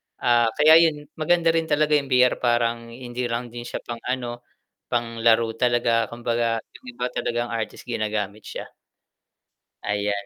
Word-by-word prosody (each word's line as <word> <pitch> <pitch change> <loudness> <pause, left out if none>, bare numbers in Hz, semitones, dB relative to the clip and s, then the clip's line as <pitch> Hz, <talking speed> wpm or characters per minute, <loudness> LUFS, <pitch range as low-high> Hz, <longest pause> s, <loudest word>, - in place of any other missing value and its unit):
Ah, 120 -1 +3
kaya 155 +2 +7
'yun 155 -3 +2 0.2
maganda 165 +1 +3
rin 165 -1 0
talaga 150 0 +2
'yung 145 -2 +3
VR 125 -1 +3
parang 120 -1 +1
hindi 120 +1 -5
lang 120 0 -4
din 120 0 -7
siya - - -6
pang-ano, 120 0 -4 0.5
pang-laro 115 -1 +2
talaga, 120 -2 +2
kumbaga 115 -1 -1
'yung - - -17
iba 125 - -2
talagang 120 0 -2
artist 115 -2 -4
ginagamit 105 -3 -3
siya. - - -6 1.2
Ayan. 100 0 -1
120 Hz, 140 wpm, -24 LUFS, 115-125 Hz, 1.2 s, kaya